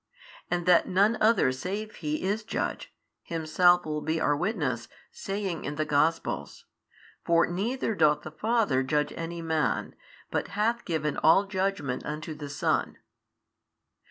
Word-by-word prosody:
And 175 -1 -1
that 180 -2 +5
none 200 +5 +3
other 220 - +4
save 200 +11 -5
He 155 0 -3
is 205 +3 -1
Judge, 220 - -3 0.3
Himself 175 +2 +3
will 150 -1 -3
be 160 +1 -1
our 145 - +2
witness, 145 - -2 0.2
saying 195 -3 -4
in 145 - -4
the 155 +1 -1
Gospels, 150 - 0 0.6
For 170 0 +4
neither 225 +7 -2
doth 150 -6 +3
the 155 - -7
Father 210 - +1
judge 150 +3 0
any 170 0 -5
man, 160 -2 0 0.4
but - - -1
hath 230 +3 +1
given 155 -4 -1
all 165 +6 +5
judgment 190 -8 -2
unto 155 +1 -5
the 150 -1 -8
Son. 145 - -1
165 Hz, 140 wpm, -28 LUFS, 150-195 Hz, 0.6 s, that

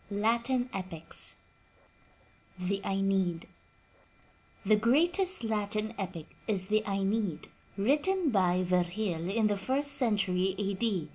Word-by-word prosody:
*LATIN 235 +5 +1
EPICS 180 -4 -3 1.2
THE 190 +2 -2
AENEID 195 -3 0 1.2
The 215 - +5
greatest 340 - +2
Latin 215 0 -1
epic 180 -6 -6
is 190 -4 -1
the 215 0 +3
Aeneid, 195 -3 -1 0.3
written 295 - +2
by 185 -3 +2
Vifgil 180 0 0
in 220 +1 +2
the 205 -1 +2
first 270 +8 0
century 195 -7 +1
A. 200 -1 -1
D. 195 -6 -1
200 Hz, 110 wpm, -30 LUFS, 185-230 Hz, 1.2 s, The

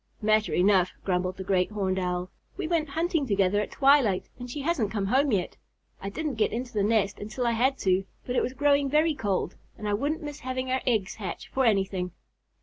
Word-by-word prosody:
"Matter 215 0 +2
enough," 185 0 +4
grumbled 185 0 -1
the 190 - -5
Great 185 -1 +1
Horned 190 -3 -1
Owl. 180 0 -2 0.3
"We 390 - -3
went 320 -3 0
hunting 325 -1 0
together 200 -1 +2
at - - -4
twilight 270 -9 +3
and 245 0 -7
she 285 +4 -5
hasn't 275 - 0
come 205 -2 -2
home 265 +7 +2
yet. 190 -5 -1 0.4
I 195 - -4
didn't 300 +2 -3
get - - +3
into 245 +1 -4
the 210 - +1
nest 205 -1 +1
until 215 +4 -4
I 235 - +3
had 260 +4 +2
to, 190 0 +2 0.2
but 250 - -3
it - - +3
was 255 - -2
growing 280 0 +2
very 310 +3 +3
cold 200 -8 -1 0.2
and 210 - -5
I 205 - 0
wouldn't 295 - -1
miss 295 -1 -6
having 255 0 -3
our 260 - +1
eggs 215 -6 0
hatch 195 -5 -6
for 265 -1 +1
anything. 190 -4 +1
220 Hz, 215 wpm, -27 LUFS, 195-275 Hz, 0.4 s, enough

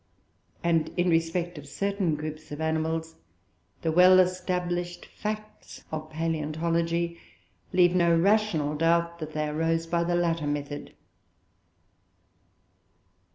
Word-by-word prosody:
And 165 -2 +2
in 175 0 +2
respect 165 0 0
of 145 - -12
certain 195 0 -1
groups 155 +1 -7
of 145 - -6
animals, 160 +1 -1 0.7
the 160 - +1
well 180 +3 +7
established 180 -1 -1
facts 215 0 -7
of 155 0 -5
paleontology 165 +2 -1 0.5
leave 180 -1 +4
no 170 -2 +4
rational 180 -5 +2
doubt 170 +2 +1
that 155 -1 -6
they 155 0 -1
arose 165 +2 0
by 170 0 0
the 175 +1 0
latter 165 -3 0
method. 145 0 -4
165 Hz, 110 wpm, -27 LUFS, 155-175 Hz, 0.7 s, well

